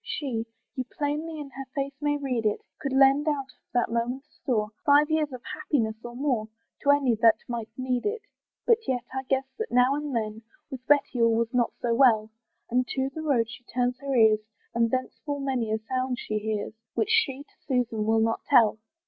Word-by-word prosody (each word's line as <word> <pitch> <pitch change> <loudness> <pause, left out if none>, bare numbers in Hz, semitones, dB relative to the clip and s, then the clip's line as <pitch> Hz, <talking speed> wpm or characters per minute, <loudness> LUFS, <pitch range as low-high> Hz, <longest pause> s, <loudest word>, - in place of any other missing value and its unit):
she, 240 -6 -3 0.3
You 260 - -2
plainly 300 +4 -3
in 285 -2 -7
her 270 0 -7
face 275 0 -2
may 290 0 +1
read 260 -5 -2
it, 210 -1 0 0.2
Could 275 - -3
lend 270 +3 +5
out 275 -3 -1
of - - -43
that 240 -2 +2
moment's 245 +5 -2
store 215 -6 0
Five 295 +1 +5
years 310 -2 +1
of 255 -2 -8
happiness 250 -8 0
or 240 0 -8
more, 250 -5 0 0.3
To 285 - 0
any 285 -4 +4
that 225 -1 +7
might 235 -2 -4
need 255 -1 -1
it. 430 0 -3 0.4
But 465 -2 +5
yet 250 -2 0
I 265 - -1
guess 270 0 +2
that 445 - -3
now 250 +2 +4
and 290 -2 -3
then 215 -1 -2 0.3
With 260 -2 -7
Betty 285 -4 +3
all 230 -1 +4
was 230 +1 0
not 245 -2 +2
so 235 -1 +2
well, 225 -4 +4 0.4
And 250 +1 +2
to 265 0 -1
the 315 - -5
road 265 -7 +2
she 235 +2 -11
turns 250 +1 -1
her 275 -1 -2
ears, 220 -2 +6 0.3
And 230 0 +2
thence 255 +2 -2
full 290 -2 -3
many 260 -5 -1
a 220 - +2
sound 255 +3 -2
she 215 -2 -2
hears, 215 -1 -3 0.2
Which 435 - +1
she 285 - +2
to - - -34
Susan 245 -5 0
will 225 0 +3
not 225 0 +1
tell. 230 -5 +5
255 Hz, 210 wpm, -27 LUFS, 230-285 Hz, 0.4 s, that